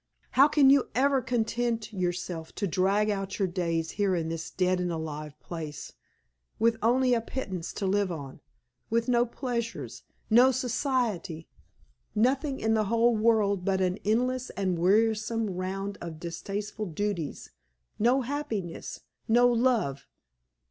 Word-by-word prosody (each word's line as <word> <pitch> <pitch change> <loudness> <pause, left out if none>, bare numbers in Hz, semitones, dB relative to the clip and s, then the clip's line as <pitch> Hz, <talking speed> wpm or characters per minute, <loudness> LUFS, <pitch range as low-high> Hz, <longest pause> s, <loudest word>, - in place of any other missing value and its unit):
How 275 +2 +6
can 290 -3 +5
you 280 -2 +4
ever 270 +1 +3
content 235 -1 -1
yourself 175 -3 -3
to 200 - -1
drag 195 +3 +2
out 195 -1 -3
your 195 - +1
days 170 -3 -1
here 200 -3 +1
in 165 -2 -2
this 165 0 -4
dead 185 0 +1
and 180 -1 -1
alive 155 -2 -5
place, 155 -4 -7 0.6
with 230 +1 +3
only 250 +2 +3
a 235 - +2
pittance 190 -8 -5
to 200 - -3
live 195 0 +1
on, 140 -5 -7 0.5
with 230 +1 +1
no 240 -1 +3
pleasures, 230 - -4 0.3
no 245 +4 +6
society 240 - -1 0.7
nothing 265 +5 +1
in 220 0 +1
the 215 -1 +2
whole 230 +2 +3
world 215 -4 +2
but 190 0 +1
an 185 +1 0
endless 250 +4 0
and 185 -3 0
wearisome 220 +3 +2
round 195 +2 -4
of 165 -2 -7
distasteful 205 +5 -5
duties, 175 -2 -3 0.5
no 245 +5 +3
happiness, 235 - -4 0.3
no 240 +2 +5
love. 230 - +1
210 Hz, 140 wpm, -28 LUFS, 180-240 Hz, 0.7 s, How